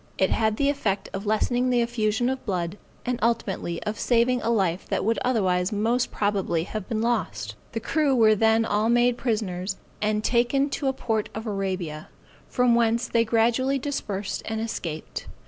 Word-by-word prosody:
It 190 - +2
had 220 -1 +1
the 280 - +2
effect 205 -9 -1
of 200 +2 -5
lessening 245 +4 +1
the 245 -1 +3
effusion 235 0 0
of 265 0 -2
blood, 180 -1 -3 0.3
and 245 -1 -1
ultimately 215 -7 -1
of 210 0 -3
saving 245 +1 +2
a - - -1
life 190 -6 +1
that - - 0
would 225 +1 +1
otherwise 190 -6 +1
most 230 +4 +1
probably 195 -5 0
have 215 +3 -6
been 225 -2 -1
lost. 105 - -1 0.2
The 225 - -1
crew 290 +2 +1
were 220 -3 +6
then 225 +1 +3
all 215 +1 +1
made 240 +1 +4
prisoners, 205 -6 -2 0.2
and 215 0 0
taken 255 +5 +2
to 280 - -2
a 265 - +2
port 220 -5 -1
of 220 +1 -5
Arabia, 190 -7 -3 0.4
from 250 -2 +3
whence 235 0 +2
they 230 -1 +2
gradually 235 +4 +2
dispersed 205 -8 -3
and 220 0 -2
escaped. 170 -8 -5
220 Hz, 175 wpm, -25 LUFS, 195-240 Hz, 0.4 s, were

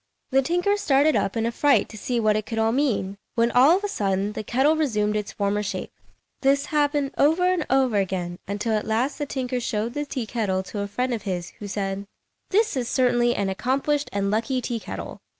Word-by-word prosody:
The 270 +1 +4
tinker 355 +8 +1
started 295 -4 +3
up 195 +4 0
in 225 - 0
a 235 - 0
fright 270 -2 +3
to - - -10
see 240 +3 -2
what 215 -2 +3
it 215 -1 -2
could 225 - -4
all 225 0 +2
mean, 230 -7 0 0.2
when 235 0 +2
all 275 +8 +6
of 400 - -7
a - - 0
sudden 200 - -1
the 215 - -4
kettle 265 +8 +2
resumed 215 -9 0
its 210 -1 -2
former 205 0 0
shape. 205 - -4 0.5
This 280 +1 +3
happened 290 -2 +1
over 320 +5 +4
and 365 -3 +1
over 260 -4 +3
again, 180 -3 -2
until 205 +3 -1
at 215 - -1
last 235 +7 0
the 290 - -2
tinker 255 -2 -2
showed 225 0 -2
the 295 +1 -2
tea 255 -4 -3
kettle 205 -5 -1
to 205 - -6
a 200 - -2
friend 250 +5 -1
of 225 - -3
his, 180 -4 -4
who 205 - -6
said, 195 0 -3 0.4
"This 430 -1 +2
is 245 -2 -2
certainly 240 -2 +2
an 200 -1 0
accomplished 275 +8 0
and 200 0 -1
lucky 230 +5 0
tea 240 -1 -3
kettle. - - -7
235 Hz, 220 wpm, -24 LUFS, 205-275 Hz, 0.5 s, all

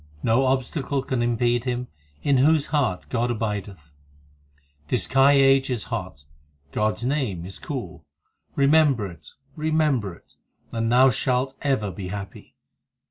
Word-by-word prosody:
No 120 +4 +3
obstacle 135 +1 -1
can 130 -3 -2
impede 120 0 +1
him 125 0 -2 0.4
In 140 -2 +3
whose 150 +2 +4
heart 130 -12 0
God 120 -1 0
abideth. 100 -9 -4 0.9
This 125 - +1
Kal 135 +1 +4
age 135 -1 +5
is 120 -5 -3
hot; 70 0 -5 0.5
God 110 0 0
s 115 - -8
name 125 - -1
is 95 - -9
cool; - - -6 0.5
Remember 140 -5 +4
it, 85 -5 -10 0.3
remember 150 - 0
it, - - -24 0.3
and 115 0 -1
thou 130 +2 +6
shalt 130 +3 0
ever 130 -8 0
be 95 +1 -7
happy. 100 0 -8
125 Hz, 135 wpm, -24 LUFS, 105-135 Hz, 0.9 s, thou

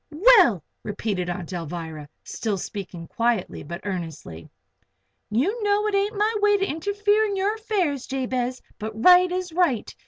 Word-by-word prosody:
"Well," 335 - +5 0.2
repeated 200 -3 -3
Aunt 175 0 -5
Alvirah, 165 -3 -6 0.2
still 215 -3 -3
speaking 185 -4 -7
quietly 230 -4 -1
but 170 +4 -7
earnestly. 165 - -6 0.8
"You 345 - 0
know 415 0 +2
it 425 - -1
ain't 400 +2 0
my 425 +2 +2
way 415 0 +4
to 390 - 0
interfere 410 +6 +1
in 405 -2 -2
your 390 +2 +1
affairs, 385 - -2
Jabez. 255 -1 -2 0.2
But 220 0 -6
right 360 +6 +6
is 365 -2 -3
right. 330 - 0
265 Hz, 150 wpm, -24 LUFS, -, 0.8 s, right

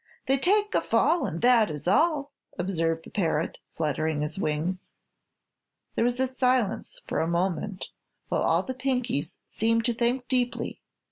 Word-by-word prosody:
"They'd 270 0 +2
take 415 +5 +3
a - - +3
fall 340 0 +2
And 165 - -4
that 240 -4 +5
is 150 +1 -6
all!" 290 - +3 0.3
observed 165 -3 -1
the - - -12
parrot, 165 -5 -1
fluttering 155 -1 -1
its 150 +1 -3
wings. 170 +3 -2 1.0
There - - +1
was 245 +1 +1 0.2
silence 250 -5 +1
for - - -1
a 160 - +1
moment, 185 +3 -1 0.4
while - - 0
all - - +3
the 260 - -4
Pinkies 250 - -1
seemed 230 +1 +1
to 240 - +2
think 245 +2 0
deeply. 250 -2 -1
220 Hz, 150 wpm, -27 LUFS, 165-255 Hz, 1.0 s, that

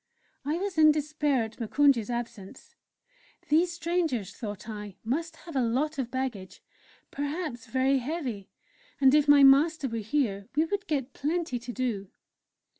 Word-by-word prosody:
I 295 +4 -1
was 375 -3 -3
in 310 0 +8
despair 300 -3 0
at 220 +2 -9
Moukounj's 245 -1 +2
absence. 235 -5 -6 0.8
These 335 +4 +3
strangers, 330 - -1
thought 210 -1 -7
I, 210 -3 -7
must 320 +8 -2
have 335 -4 -9
a 265 - +2
lot 275 +6 0
of 250 -3 -2
baggage, 250 -7 -5 0.5
perhaps 285 -4 -4
very 265 +3 +2
heavy, 255 - -4 0.5
and 265 -1 +5
if 300 -1 +4
my 290 -1 +7
master 285 +2 +5
were 230 -2 -4
here 215 -4 -1
we 310 +2 +3
would 405 +4 -3
get 275 -4 -2
plenty 310 -4 -2
to 245 +1 -7
do. 235 -6 -2
270 Hz, 150 wpm, -28 LUFS, 230-310 Hz, 0.8 s, in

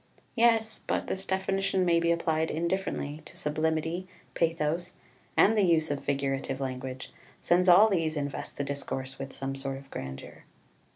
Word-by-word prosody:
Yes, 225 -2 +3
but - - 0
this 190 0 -3
definition 190 0 +1
may 170 -1 +4
be 170 0 +2
applied 160 -1 +1
indifferently 170 -3 -2
to - - -12
sublimity, 160 +4 -1 0.3
pathos, 165 +2 0 0.4
and 220 - +6
the 210 - +4
use 165 -4 +3
of 145 - -3
figurative 135 -1 -1
language, 130 -1 -5 0.3
since 180 +1 +2
all 185 +5 +8
these 165 -6 0
invest 140 -1 -4
the 140 - -1
discourse 135 -1 -4
with 135 0 -5
some 135 0 -4
sort 135 0 -4
of 135 0 -14
grandeur. 65 0 -7
160 Hz, 155 wpm, -29 LUFS, 140-180 Hz, 0.4 s, all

